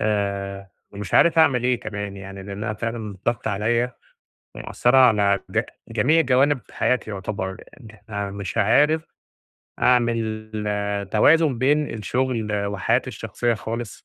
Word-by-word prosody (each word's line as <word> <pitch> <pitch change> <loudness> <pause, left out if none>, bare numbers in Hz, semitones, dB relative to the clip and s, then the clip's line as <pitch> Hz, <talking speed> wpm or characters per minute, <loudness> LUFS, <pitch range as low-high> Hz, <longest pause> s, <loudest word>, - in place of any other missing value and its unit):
آآ، 100 -2 -2 0.2
ومش 100 -1 -6
عارف 165 -1 +5
أعمل 130 -6 +4
إيه 125 -1 +1
كمان؟ 100 -2 -5
يعني 95 0 -9
لأنها 105 +3 -4
فعلًا 110 -2 -5
ضاغطه 120 -2 0
عليَّ، 115 +5 0 0.6
ومأثرة 125 +2 +1
على 105 -6 +4
ج - - +2 0.3
جميع 125 +9 +3
جوانب 135 0 +3
حياتي 125 -3 0
يُعتبر، 95 -1 -4 0.3
إن 110 -3 -12
احنا 105 -2 -6
مش 100 0 -5
عارف 145 +10 +3 0.8
أعمل 115 -3 +1 0.6
توازن 150 +3 +4
بين 145 +3 +2
الشغل 110 -2 -1
وحياتي 100 -2 0
الشخصية 120 -1 -2
خالص، 115 0 -6
110 Hz, 125 wpm, -23 LUFS, 100-125 Hz, 0.8 s, عارف